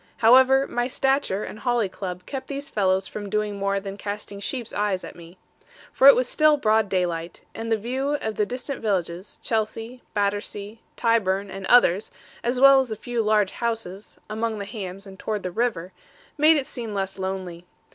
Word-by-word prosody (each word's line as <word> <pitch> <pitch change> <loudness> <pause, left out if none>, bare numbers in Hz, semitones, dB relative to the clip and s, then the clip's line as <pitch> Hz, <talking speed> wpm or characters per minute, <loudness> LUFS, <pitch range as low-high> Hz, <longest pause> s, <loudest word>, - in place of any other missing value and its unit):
However, 260 +3 +6
my 240 -2 -1
stature 265 -6 0
and 215 - -7
holly 240 -4 +1
club 180 -1 -6
kept 270 -2 -6
these 280 0 -6
fellows 190 -2 +1
from 205 0 -7
doing 210 -1 -1
more 200 0 0
than 195 0 -7
casting 205 0 -6
sheep's 240 +3 -4
eyes 205 -3 0
at - - -9
me. 170 +1 -14 0.5
For 270 - +5
it 280 - +10
was 250 0 +1
still 305 +1 +4
broad 220 -5 +2
daylight, 175 -3 -2
and 225 0 -5
the 225 - +3
view 260 +6 -2
of 220 - -3
the 210 -1 0
distant 255 +3 -5
villages, 185 -3 -2
Chelsea, 225 +2 -2
Battersea, 205 +1 -2
Tyburn, 200 -4 +1
and 195 0 -6
others, 210 -5 +5 0.3
as 245 +2 0
well 275 0 +8
as 260 -2 -1
a 220 - -3
few 235 +2 -2
large 210 -2 +2
houses, 225 -4 -4
among 220 +1 -2
the 200 - -5
hams 195 -2 -6
and 190 0 -12
towards 215 -2 -3
the 185 - -3
river, 190 -5 -2 0.4
made 310 +1 +5
it 275 - -1
seem 230 -5 -6
less 195 0 -2
lonely. 185 -2 -5
210 Hz, 185 wpm, -24 LUFS, 195-245 Hz, 0.5 s, it